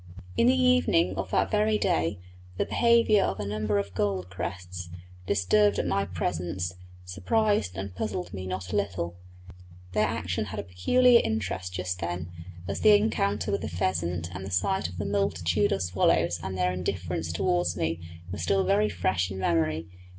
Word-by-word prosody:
In 115 - +4
the 85 - +4
evening 85 +2 +3
of 95 -1 -3
that - - +1
very 215 0 +2
day 80 - 0 0.4
the - - +1
behaviour 235 -3 +4
of - - -2
a 105 - -3
number 105 0 -1
of 100 -1 -2
gold 95 -2 -1
crests, 90 -1 -6 0.4
disturbed 100 +1 +3
at - - 0
my 100 - +1
presence, 90 0 -3 0.3
surprised 95 - 0
and 95 -1 -5
puzzled 95 -2 -4
me 95 -1 -5
not 95 0 -4
a - - 0
little; 90 -4 -2 0.8
their 105 +3 +2
action 90 +4 -2
had 105 +1 -6
a - - -3
peculiar 235 - +4
interest 95 -4 -2
just 90 0 -3
then, 85 0 -4 0.4
as - - -3
the 215 -1 +7
encounter 105 - +1
with 100 - 0
the - - -4
pheasant, 85 -1 -1
and 90 +1 -6
the 95 - -6
sight 100 - 0
of 90 - -10
the 100 - -3
multitude 100 -1 +1
of 95 -1 0
swallows 85 -1 +2
and 95 +1 -4
their 90 0 +1
indifference 90 -2 -3
towards 85 +1 0
me 80 +1 -1 0.3
were 100 - -5
still 95 +3 +2
very 105 +3 +2
fresh 95 -1 0
in 95 - -6
memory. 80 -3 0
95 Hz, 175 wpm, -27 LUFS, 85-100 Hz, 0.8 s, the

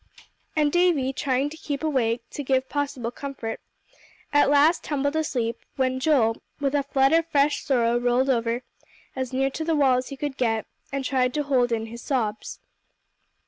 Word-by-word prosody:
And 300 -2 +2
Davie, 335 -7 +2
trying 270 +1 0
to 320 - -9
keep 290 -2 -4
awake, 240 -6 0
to - - -5
give 265 -1 +1
possible 280 -5 -3
comfort, 265 -4 -6 0.7
at 290 -1 +5
last 290 +4 +4
tumbled 285 0 -1
asleep, 245 -7 -1 0.2
when 260 -1 0
Joel 260 -6 +2 0.2
with 280 -1 0
a 290 - +3
flood 270 0 +2
of 330 0 +3
fresh 290 -2 +2
sorrow 240 -4 +2
rolled 245 +2 +2
over 235 -1 0 0.5
as 260 -1 -3
near 270 +1 0
to 315 - -4
the 325 0 +1
wall 270 -4 +4
as 255 - -6
he 275 - -7
could 285 -1 -4
get, 225 -3 0 0.3
and 275 -1 -3
tried 255 -1 +1
to 295 - +1
hold 255 -4 +2
in 225 -1 -1
his 235 +1 -9
sobs. 220 -6 -2
270 Hz, 180 wpm, -25 LUFS, 245-290 Hz, 0.7 s, at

